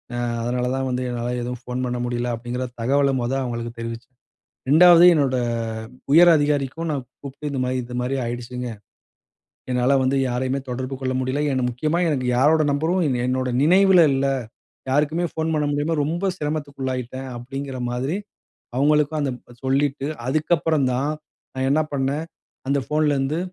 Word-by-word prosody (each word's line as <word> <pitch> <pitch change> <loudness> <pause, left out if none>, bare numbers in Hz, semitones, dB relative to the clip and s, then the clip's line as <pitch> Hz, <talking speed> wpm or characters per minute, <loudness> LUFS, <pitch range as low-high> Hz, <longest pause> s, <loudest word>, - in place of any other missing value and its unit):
அ-அதனால 120 +1 -1
தான் 135 0 -1
வந்து 125 0 -1
என்னால 120 0 -3
எதுவும் 125 0 -5
ஃபோன் 125 +1 -3
பண்ண 125 0 -2
முடியல 120 0 -2
அப்டிங்ற 120 +2 -4 0.2
தகவல 140 +3 +2
மொதல் 130 +3 -1
அவங்களுக்கு 120 -1 -4
தெரிவிச்சேன். 115 +2 -7 0.6
ரெண்டாவது 175 +2 +8
என்னோட 140 -4 +2 0.8
உயர் 170 +2 +8
அதிகாரிக்கும் 145 +2 0
நான் 135 -3 -3 0.2
கூப்ட்டு 140 +1 -6
இந்த 135 -2 -2
மாரி, 130 +1 -1
"இது 125 +1 -7
மாதிரி 130 +2 -1
ஆயிடுச்சுங்க. 120 +1 -5 1.0
என்னால 125 +2 +3
வந்து 130 +2 +1
யாரையுமே 130 +2 -1
தொடர்பு 130 +2 -4
கொள்ள 130 -1 -1
முடியல, 130 +3 -1
என்ன 130 -1 0
முக்கியமா 155 +7 -1
எனக்கு 130 -4 -1
யாரோட 155 +5 +4
நம்பரும், 165 +6 +1 0.2
என்னோட 130 0 0
நினைவுல 185 +2 +6
இல்ல. 135 +1 +1 0.6
யாருக்குமே 150 +5 +1
ஃபோன் 160 0 -1
பண்ண 150 - +1
முடியாம 150 +3 0
ரொம்ப 170 +6 -1
சிரமத்துக்குள்ளாயிட்டேன்" 135 -4 -4
அப்டிங்ற 135 +2 -6
மாதிரி 130 +8 -2 0.6
அவுங்களுக்கும் 150 +2 +2
அந்த 140 -2 0 0.3
சொல்லிட்டு, 135 +1 0 0.2
அதுக்கப்புறம் 155 0 +1
தான் 135 +4 0 0.4
நான் 130 0 -1
என்ன 155 +2 +3
பண்ணேன், 140 +3 -1 0.4
அந்த 140 +1 +2
ஃபோன்லேருந்து, 150 0 +1
135 Hz, 145 wpm, -22 LUFS, 125-150 Hz, 1.0 s, ரெண்டாவது